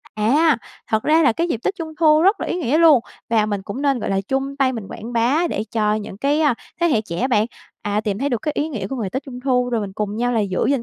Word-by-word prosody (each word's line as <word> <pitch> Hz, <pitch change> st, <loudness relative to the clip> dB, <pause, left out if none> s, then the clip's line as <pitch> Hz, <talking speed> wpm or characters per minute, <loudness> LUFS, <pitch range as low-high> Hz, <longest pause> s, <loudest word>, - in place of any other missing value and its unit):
à, 270 Hz, +7 st, +3 dB, 0.3 s
thật 220 Hz, -1 st, +1 dB
ra 315 Hz, +2 st, +4 dB
là 290 Hz, -, +4 dB
cái 335 Hz, +9 st, -1 dB
dịp 235 Hz, -, -2 dB
tết 390 Hz, -, 0 dB
Trung 320 Hz, -3 st, -6 dB
thu 310 Hz, -1 st, +5 dB
rất 390 Hz, +5 st, +3 dB
là -, -, -2 dB
ý -, -, -2 dB
nghĩa 300 Hz, -2 st, +1 dB
luôn. 320 Hz, -6 st, +6 dB, 0.3 s
Và 220 Hz, -2 st, +3 dB
mình 205 Hz, -2 st, -2 dB
cũng 205 Hz, +8 st, -6 dB
nên, 275 Hz, -3 st, +2 dB
gọi -, -, -3 dB
là, 195 Hz, 0 st, +1 dB
chung 270 Hz, +6 st, -3 dB
tay 270 Hz, -2 st, +2 dB
mình 225 Hz, -5 st, -6 dB
quảng 235 Hz, +3 st, -8 dB
bá 255 Hz, +9 st, +2 dB
để -, -, -2 dB
cho 210 Hz, -2 st, +1 dB
những 210 Hz, -2 st, -6 dB
cái, 285 Hz, +5 st, +1 dB
a, 295 Hz, -5 st, +3 dB, 0.3 s
thế 345 Hz, -, +4 dB
hệ 235 Hz, -9 st, +2 dB
trẻ 170 Hz, -5 st, -6 dB
á 260 Hz, -, +1 dB
bạn, 215 Hz, -4 st, +2 dB, 0.4 s
à, 205 Hz, 0 st, 0 dB
tìm 205 Hz, -2 st, -2 dB
thấy 280 Hz, -, 0 dB
được 240 Hz, -5 st, -2 dB
cái 300 Hz, -, -1 dB
ý 300 Hz, -, 0 dB
nghĩa 220 Hz, -11 st, -4 dB
của 270 Hz, -, -4 dB
ngày 215 Hz, -6 st, -3 dB
tết 265 Hz, +6 st, -3 dB
Trung 250 Hz, -3 st, -8 dB
thu, 250 Hz, -2 st, +2 dB
rồi 235 Hz, -2 st, 0 dB
mình 200 Hz, -2 st, -5 dB
cùng 210 Hz, +1 st, -3 dB
nhau 245 Hz, +2 st, 0 dB
là 230 Hz, -, +2 dB
giữ 190 Hz, -3 st, 0 dB
gìn 275 Hz, -4 st, +1 dB
245 Hz, 300 wpm, -21 LUFS, 215-290 Hz, 0.4 s, luôn